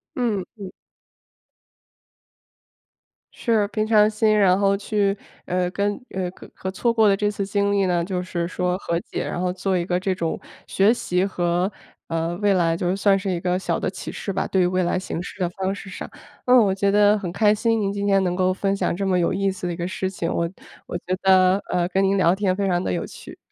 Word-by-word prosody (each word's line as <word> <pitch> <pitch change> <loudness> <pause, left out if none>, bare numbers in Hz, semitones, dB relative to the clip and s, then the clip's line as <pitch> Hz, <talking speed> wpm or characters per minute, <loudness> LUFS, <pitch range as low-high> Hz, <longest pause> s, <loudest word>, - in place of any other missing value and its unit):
嗯， 220 -7 0
嗯。 195 -3 -8 2.6
是， 225 -4 +1
平 215 0 -1
常 215 -1 +5
心， 215 0 +2
然 190 -2 +4
后 200 0 +3
去， 200 -1 0 0.3
呃， 180 0 0
跟 200 +2 -1 0.2
呃， 185 -2 -3
和 - - -13
和 190 - -5
错 220 +5 0
过 220 -2 +4
的 200 - +4
这 205 +1 0
次 200 -1 -3
经 200 0 0
历 200 -1 +2
呢， 175 -2 +1
就 180 0 -2
是 175 -2 -3
说 180 0 -1
和 170 -3 -2
解， - - -5
然 - - -3
后 180 0 0
做 185 +1 -1
一 170 -1 -1
个 180 -1 0
这 190 0 -1
种 165 -3 -2 0.3
学 200 +3 +3
习 180 -6 0
和 180 0 0 0.4
呃， 165 +1 -2
未 205 +1 +2
来 170 -3 +2
就 175 +2 0
算 195 0 +3
是 195 0 -3
一 175 -2 -1
个 180 +1 0
小 190 - -2
的 - - -1
启 185 -1 -6
示 - - -5
吧， - - -1
对 190 - +1
于 180 - +4
未 185 +1 +1
来 175 +1 0
行 185 -2 -4
事 190 - -10
的 180 - +1
方 190 +2 -3
式 200 - -10
上。 185 - -7 0.4
嗯， 250 0 +6
我 200 -5 +4
觉 200 +1 +1
得 205 +1 +4
很 180 -4 -5
开 210 +2 +3
心 225 +1 +1
您 200 -1 0
今 200 0 -3
天 195 -1 +3
能 180 -1 -1
够 185 0 +2
分 195 +1 -1
享 - - 0
这 195 +3 -2
么 185 -1 +2
有 170 - +1
意 195 +1 +1
思 185 -1 -5
的 175 - -2
一 - - -5
个 175 +1 -3
事 185 0 -3
情， 170 -3 -3
我 170 - 0 0.4
我 175 - -4
觉 185 +1 -3
得， 185 -1 +5 0.2
呃， 175 -1 +1
跟 190 +1 +1
您 195 +1 +2
聊 175 -1 +4
天 195 -1 0
非 200 +1 -1
常 175 -1 0
得 - - -1
有 - - -2
趣。 - - -12
190 Hz, 250 characters per minute, -23 LUFS, 180-200 Hz, 2.6 s, 嗯